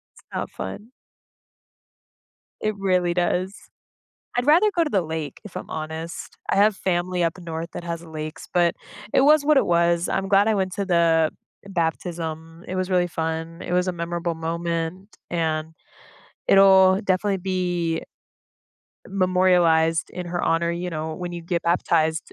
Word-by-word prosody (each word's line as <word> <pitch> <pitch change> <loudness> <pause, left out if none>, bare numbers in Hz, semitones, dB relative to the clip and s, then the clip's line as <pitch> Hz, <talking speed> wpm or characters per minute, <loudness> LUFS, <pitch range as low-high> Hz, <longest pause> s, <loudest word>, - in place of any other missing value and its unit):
It's - - -19
not - - -3
fun. 205 - -7 1.7
It 215 0 -1
really 180 -3 +1
does. 180 +2 0 0.8
I'd 245 +1 0
rather 345 +8 +6
go 335 - +4
to 300 - -2
the 195 -7 +2
lake, 160 -3 -5
if 210 - -8
I'm - - -8
honest. 160 +2 -6
I - - +2
have 205 +1 +4
family 180 -1 -1
up 165 +2 0
north 165 -1 -6
that - - -6
has 170 0 -4
lakes, 155 0 -7
but 175 -1 +3 0.4
it - - +5
was 300 +1 +5
what 300 -1 +4
it - - +4
was. 170 0 +2
I'm 195 0 -1
glad 200 +2 +5
I 220 - +3
went 190 -1 0
to 200 -2 -2
the, 165 -3 +3 0.3
eh, - - -11
baptism; 165 -1 -3
it 185 - -4
was 185 0 -1
really 180 -1 +2
fun. 160 +1 -4
It 175 - -4
was 180 +1 +2
a - - +1
memorable 170 0 -3
moment, 170 +3 -3
and 160 -2 -1 0.8
it'll 190 -1 +6
definitely 195 +1 +1
be 175 -3 -1 1.1
memorialized 180 -4 +3
in 180 -1 -6
her 175 0 -2
honor. 170 +1 +1
You 175 +1 -3
know, 155 0 -4
when 175 +1 -5
you 170 - -6
get 170 0 -2
baptized, 165 -2 +1
175 Hz, 160 wpm, -23 LUFS, 165-185 Hz, 1.7 s, rather